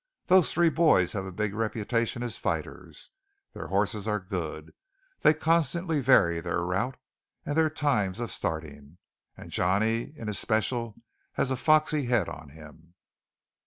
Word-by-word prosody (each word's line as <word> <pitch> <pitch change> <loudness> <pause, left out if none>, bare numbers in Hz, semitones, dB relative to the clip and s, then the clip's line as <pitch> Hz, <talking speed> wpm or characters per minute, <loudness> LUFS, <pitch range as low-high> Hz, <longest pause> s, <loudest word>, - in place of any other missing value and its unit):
Those 185 -2 +5
three 170 0 +3
boys 150 - +3
have 95 -2 -3
a - - -6
big 105 +2 -2
reputation 115 +2 -1
as 120 -3 -3
fighters; - - -4 0.4
their - - -7
horses 105 +2 0
are 105 -1 0
good; 85 -5 -6 0.5
they - - +6
constantly 160 0 +1
vary 85 -10 +4
their 85 0 -2
route 100 +9 -2 0.5
and 145 - -2
their 160 0 +3
times 120 -11 0
of 120 -2 -3
starting; 80 -2 -4 0.4
and - - -11
Johnny 110 +8 +1
in 115 - -7
especial 110 +2 -1 0.3
has 135 - 0
a - - +1
foxy 155 +1 +2
head 120 -7 +2
on 75 0 -9
him." 80 +3 -15
110 Hz, 145 wpm, -27 LUFS, 90-140 Hz, 0.5 s, they